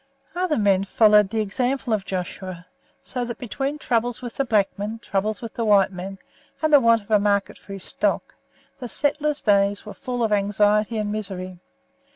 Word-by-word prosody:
Other 360 Hz, -3 st, 0 dB
men 200 Hz, -3 st, +3 dB
followed 210 Hz, 0 st, +4 dB
the 220 Hz, +1 st, -1 dB
example 245 Hz, +4 st, -1 dB
of 200 Hz, -3 st, -1 dB
Joshua, 185 Hz, -1 st, -5 dB, 0.4 s
so 250 Hz, -2 st, -4 dB
that 235 Hz, -1 st, -5 dB
between 270 Hz, +5 st, -3 dB
troubles 240 Hz, -4 st, 0 dB
with 245 Hz, -2 st, -7 dB
the 275 Hz, -, +1 dB
black 210 Hz, -5 st, +3 dB
men, 210 Hz, +3 st, -4 dB
troubles 215 Hz, 0 st, -2 dB
with 230 Hz, -, -6 dB
the 230 Hz, -, -2 dB
white 200 Hz, -3 st, +4 dB
men, 190 Hz, +1 st, -7 dB, 0.5 s
and 310 Hz, -1 st, +2 dB
the 290 Hz, -, +9 dB
want 230 Hz, -3 st, +3 dB
of 205 Hz, -, -15 dB
a 210 Hz, -, +5 dB
market 200 Hz, -1 st, 0 dB
for 200 Hz, -, -10 dB
his 195 Hz, -2 st, -8 dB
stock, -, -, -1 dB, 0.5 s
the 245 Hz, -2 st, -6 dB
settler's 295 Hz, +2 st, 0 dB
days 200 Hz, -1 st, +2 dB
were 210 Hz, -, -8 dB
full 245 Hz, +4 st, -3 dB
of 220 Hz, -, 0 dB
anxiety 210 Hz, +2 st, +2 dB
and 210 Hz, -1 st, -2 dB
misery. 185 Hz, -4 st, -5 dB
210 Hz, 190 wpm, -23 LUFS, 200-240 Hz, 0.5 s, the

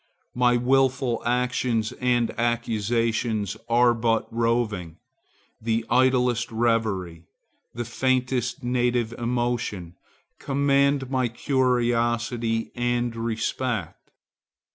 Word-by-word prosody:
My 125 Hz, 0 st, +3 dB
wilful 130 Hz, -1 st, +1 dB
actions 125 Hz, -2 st, 0 dB
and 120 Hz, -2 st, +1 dB
acquisitions 115 Hz, -2 st, -1 dB
are 120 Hz, +1 st, +4 dB
but 115 Hz, -1 st, 0 dB
roving;—the 115 Hz, 0 st, -3 dB
idlest 125 Hz, -2 st, +2 dB
reverie, 110 Hz, -8 st, -1 dB, 0.5 s
the 120 Hz, 0 st, -3 dB
faintest 125 Hz, +1 st, -1 dB
native 120 Hz, -2 st, 0 dB
emotion, 120 Hz, -7 st, -2 dB, 0.5 s
command 140 Hz, -1 st, +1 dB
my 130 Hz, -2 st, +1 dB
curiosity 120 Hz, -2 st, 0 dB
and 120 Hz, -1 st, -1 dB
respect. 115 Hz, +1 st, -3 dB
120 Hz, 75 wpm, -25 LUFS, 115-125 Hz, 0.5 s, are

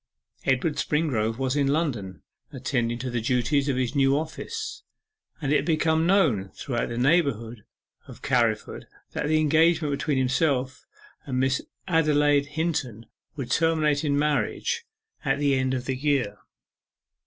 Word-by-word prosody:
Edward 130 Hz, +4 st, +1 dB
Springrove 120 Hz, -8 st, 0 dB
was 130 Hz, 0 st, -1 dB
in 140 Hz, -2 st, +2 dB
London, 130 Hz, -, -2 dB, 0.3 s
attending 120 Hz, -1 st, -1 dB
to 125 Hz, +1 st, -4 dB
the 120 Hz, -1 st, -1 dB
duties 130 Hz, +4 st, +1 dB
of 130 Hz, -, 0 dB
his 130 Hz, 0 st, -1 dB
new 135 Hz, -1 st, +3 dB
office, 430 Hz, -, -5 dB, 0.6 s
and 145 Hz, -2 st, 0 dB
it -, -, +5 dB
had 140 Hz, -, -2 dB
become 160 Hz, 0 st, +2 dB
known 150 Hz, -, +2 dB
throughout 120 Hz, -3 st, -3 dB
the 120 Hz, -, -4 dB
neighbourhood 120 Hz, -, +1 dB, 0.4 s
of -, -, -13 dB
Carriford 115 Hz, -4 st, 0 dB, 0.2 s
that 150 Hz, -, -2 dB
the 155 Hz, +1 st, +3 dB
engagement 160 Hz, 0 st, +3 dB
between 140 Hz, 0 st, -1 dB
himself 130 Hz, 0 st, 0 dB, 0.4 s
and 130 Hz, -2 st, -1 dB
Miss 130 Hz, 0 st, +1 dB, 0.3 s
Adelaide 145 Hz, -4 st, +3 dB
Hinton 150 Hz, -8 st, -3 dB, 0.3 s
would 130 Hz, -5 st, -5 dB
terminate 155 Hz, -1 st, +2 dB
in 145 Hz, -2 st, +1 dB
marriage 150 Hz, -, -1 dB, 0.4 s
at 135 Hz, -2 st, +1 dB
the 145 Hz, -1 st, +2 dB
end 130 Hz, 0 st, +1 dB
of 125 Hz, -, -4 dB
the 130 Hz, -, -1 dB
year. 130 Hz, -7 st, 0 dB
140 Hz, 145 wpm, -25 LUFS, 125-155 Hz, 0.6 s, it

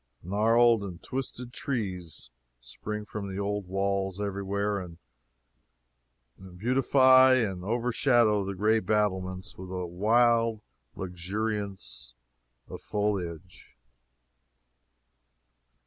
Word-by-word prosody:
Gnarled 115 Hz, +3 st, +3 dB
and 90 Hz, -4 st, -7 dB
twisted 125 Hz, -2 st, -5 dB
trees 90 Hz, -, -4 dB, 0.3 s
spring 105 Hz, -, -6 dB
from 105 Hz, -1 st, -6 dB
the 95 Hz, +1 st, -5 dB
old 100 Hz, -1 st, -2 dB
walls 95 Hz, 0 st, -1 dB
every 100 Hz, -1 st, -3 dB
where, 100 Hz, +1 st, -1 dB
and 85 Hz, -3 st, -9 dB, 1.6 s
beautify 130 Hz, +3 st, +5 dB
and 100 Hz, -7 st, -1 dB
overshadow 120 Hz, -1 st, +2 dB
the 100 Hz, 0 st, -4 dB
gray 110 Hz, +4 st, +3 dB
battlements 95 Hz, -2 st, -1 dB
with 95 Hz, 0 st, -8 dB
a 90 Hz, -1 st, -3 dB
wild 115 Hz, +4 st, +2 dB, 0.3 s
luxuriance 95 Hz, -, -4 dB, 0.5 s
of -, -, -9 dB
foliage. 95 Hz, -4 st, -4 dB
100 Hz, 90 wpm, -28 LUFS, 95-115 Hz, 1.6 s, beautify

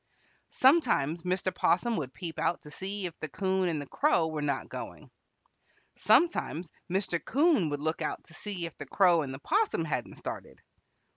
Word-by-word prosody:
Sometimes 235 Hz, -, +3 dB
Mr. 185 Hz, +1 st, -1 dB
'Possum 230 Hz, +6 st, +2 dB
would 135 Hz, -5 st, -3 dB
peep 160 Hz, +5 st, -6 dB
out 170 Hz, +2 st, 0 dB
to 150 Hz, -, -12 dB
see 195 Hz, +3 st, -3 dB
if 175 Hz, -, -3 dB
the 155 Hz, -, -3 dB
'Coon 190 Hz, +2 st, 0 dB
and 160 Hz, -3 st, -1 dB
the 145 Hz, -, -5 dB
Crow 170 Hz, -, +2 dB
were 155 Hz, -1 st, -3 dB
not 140 Hz, -2 st, -1 dB
going. -, -, -8 dB, 0.8 s
Sometimes 180 Hz, -, +2 dB, 0.2 s
Mr. 185 Hz, -3 st, 0 dB
'Coon 285 Hz, -, +3 dB
would 145 Hz, -1 st, -3 dB
look 160 Hz, +1 st, -1 dB
out -, -, -3 dB
to -, -, -17 dB
see 185 Hz, 0 st, -4 dB
if 165 Hz, -, -8 dB
the 145 Hz, -, -7 dB
Crow 175 Hz, 0 st, +4 dB
and 140 Hz, -3 st, -4 dB
the 135 Hz, -, -6 dB
'Possum 415 Hz, -, +1 dB
hadn't -, -, -3 dB
started. -, -, -7 dB
175 Hz, 175 wpm, -29 LUFS, 155-200 Hz, 0.8 s, Crow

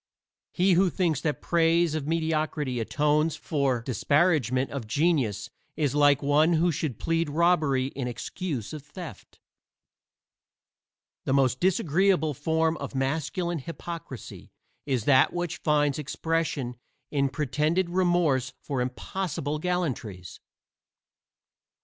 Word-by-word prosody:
He 185 Hz, +1 st, +3 dB
who 185 Hz, +2 st, +4 dB
thinks 170 Hz, -6 st, 0 dB
that 150 Hz, -2 st, -2 dB
praise 170 Hz, -1 st, +3 dB
of 155 Hz, -2 st, -3 dB
mediocrity 155 Hz, -5 st, -1 dB
atones 150 Hz, +6 st, +1 dB
for 135 Hz, -6 st, -1 dB
disparagement 135 Hz, -, +1 dB
of 135 Hz, -6 st, -5 dB
genius 140 Hz, -, 0 dB, 0.3 s
is 145 Hz, -4 st, +1 dB
like 145 Hz, -1 st, +4 dB
one 150 Hz, +4 st, +4 dB
who 170 Hz, +2 st, +3 dB
should 140 Hz, -6 st, -3 dB
plead 165 Hz, -1 st, 0 dB
robbery 155 Hz, -5 st, +2 dB
in 135 Hz, -2 st, -4 dB
excuse 130 Hz, -, -4 dB
of 155 Hz, -, -6 dB
theft. 150 Hz, -, -11 dB, 1.9 s
The 135 Hz, -, +1 dB
most 130 Hz, -2 st, +2 dB
disagreeable 175 Hz, -2 st, +2 dB
form 160 Hz, +3 st, 0 dB
of -, -, -7 dB
masculine 160 Hz, +5 st, -1 dB
hypocrisy 165 Hz, -3 st, -8 dB, 0.4 s
is 130 Hz, -5 st, 0 dB
that 135 Hz, -2 st, +5 dB
which 175 Hz, -2 st, -3 dB
finds 150 Hz, -2 st, +1 dB
expression 150 Hz, -4 st, -2 dB, 0.3 s
in 140 Hz, -2 st, +1 dB
pretended 155 Hz, +5 st, 0 dB
remorse 175 Hz, -8 st, +2 dB
for 135 Hz, -4 st, -3 dB
impossible 150 Hz, +3 st, -3 dB
gallantries. 135 Hz, -, -3 dB
150 Hz, 115 wpm, -27 LUFS, 135-170 Hz, 1.9 s, that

